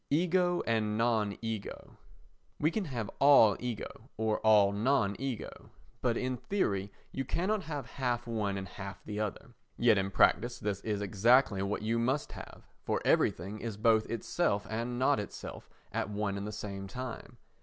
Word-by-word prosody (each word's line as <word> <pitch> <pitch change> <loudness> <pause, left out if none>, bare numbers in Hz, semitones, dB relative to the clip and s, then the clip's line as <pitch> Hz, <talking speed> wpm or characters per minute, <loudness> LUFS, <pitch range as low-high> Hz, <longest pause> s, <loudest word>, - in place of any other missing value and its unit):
Ego 175 +3 +2
and 110 -2 0
Non 110 -3 +1
Ego 110 -3 -5 0.6
You 155 +2 +2
can 215 0 -1
have 120 -8 -3
all 135 -8 +7
ego, 120 0 -6
or 110 -1 0
all 105 -2 +5
non 105 -1 +1
ego, 130 -4 -5 0.3
but 120 -2 +1
in 130 0 -1
theory 100 - -1 0.2
you 135 - -2
cannot 190 +7 -1
have 150 -3 -4
half 125 -3 -2
one 105 -4 -1
and 95 0 -5
half 100 +1 -8
the 105 0 -5
other—yet 105 -1 0
in 95 0 -1
practice 120 +5 +3
this 100 -1 -3
is 105 -2 -2
exactly 105 +1 +4
what 100 +2 -2
you 115 +2 +1
must 130 +5 0
have, - - -10 0.2
for - - -1
everything 100 +5 +1
is 110 -3 -5
both 110 0 +3
itself 110 -2 0
and 120 +2 -2
not 130 -1 +3
itself 105 - -7 0.2
at 95 - -2
one 105 -1 -2
and 100 +1 -4
the - - -4
same 100 -1 -6
time. 125 +3 -7
110 Hz, 165 wpm, -31 LUFS, 100-130 Hz, 0.6 s, all